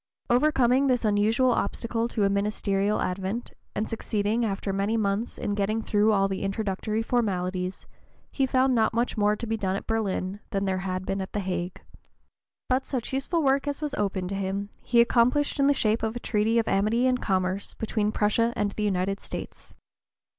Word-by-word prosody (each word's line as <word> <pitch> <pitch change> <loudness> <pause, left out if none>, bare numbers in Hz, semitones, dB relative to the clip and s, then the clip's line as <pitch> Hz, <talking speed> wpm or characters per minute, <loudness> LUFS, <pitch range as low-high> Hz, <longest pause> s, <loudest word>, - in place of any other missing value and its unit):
Overcoming 260 0 +3
this 250 -3 +1
unusual 220 +5 +3
obstacle 230 0 -1
to 220 -3 -1
a 200 - +3
ministerial 200 0 0
advent, 190 +5 -3 0.2
and 210 - -1
succeeding, 220 +1 -1
after 195 -2 -2
many 200 +3 0
months, 205 +2 -1
in 205 - -2
getting 210 +2 0
through 210 +1 +3
all 195 -2 +3
the 195 -1 -3
introductory 210 +2 -2
formalities, 185 -6 -1 0.5
he 270 -2 +1
found 260 0 +3
not 225 -1 +2
much 235 +1 0
more 210 -1 +2
to 235 - -5
be 225 0 -1
done 190 -3 -1
at - - -5
Berlin 205 -3 -1
than 195 0 -1
there 190 -1 0
had 185 0 -3
been 195 0 -2
at 190 - -7
the 210 - -1
Hague. 180 -2 -4 0.8
But 260 +1 +1
such 255 -2 -3
useful 310 +5 0
work 275 +1 +2
as 285 -1 -2
was 300 -2 -3
open 195 -6 -1
to 195 - -3
him 195 +1 -2
he 235 -1 +4
accomplished 250 +5 +2
in 275 - +4
the - - +5
shape 220 -5 +1
of 220 +1 -2
a - - -3
treaty 220 0 +1
of 230 - +2
amity 215 +5 +2
and 255 -1 +2
commerce 190 0 -1
between 215 -1 -1
Prussia 230 +3 +2
and 205 -1 0
the 215 - -5
United 195 0 0
States. - - -8
215 Hz, 190 wpm, -26 LUFS, 195-235 Hz, 0.8 s, the